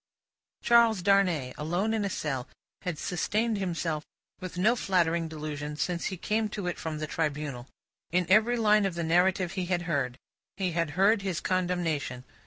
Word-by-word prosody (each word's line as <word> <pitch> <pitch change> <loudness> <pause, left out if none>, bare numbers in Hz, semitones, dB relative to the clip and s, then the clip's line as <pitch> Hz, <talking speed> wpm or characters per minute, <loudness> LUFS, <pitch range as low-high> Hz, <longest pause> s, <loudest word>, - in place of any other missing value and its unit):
Charles 230 -5 +5
Darnay, 180 -10 +2
alone 175 +8 0
in 220 -2 0
a 200 - -1
cell, 135 -8 -3 0.3
had 180 -4 -3
sustained 210 +7 -1
himself 165 -4 -2 0.4
with 185 -2 -7
no 215 +7 +4
flattering 170 -6 +1
delusion 150 -1 -5
since 170 +3 -2
he 190 - -2
came 215 +4 0
to 200 -2 -5
it 180 - -3
from 160 -1 -4
the 155 - -3
Tribunal. 145 -5 -3 0.4
In 180 +1 +2
every 220 +5 +4
line 210 -2 +4
of 185 - -5
the 170 - -2
narrative 180 +2 +2
he 185 -2 -3
had 175 -1 0
heard, 140 -7 -1 0.4
he 190 -2 0
had 165 -1 0
heard 200 +2 +4
his 190 -4 -2
condemnation. 175 -8 -1
180 Hz, 170 wpm, -28 LUFS, 155-195 Hz, 0.4 s, Charles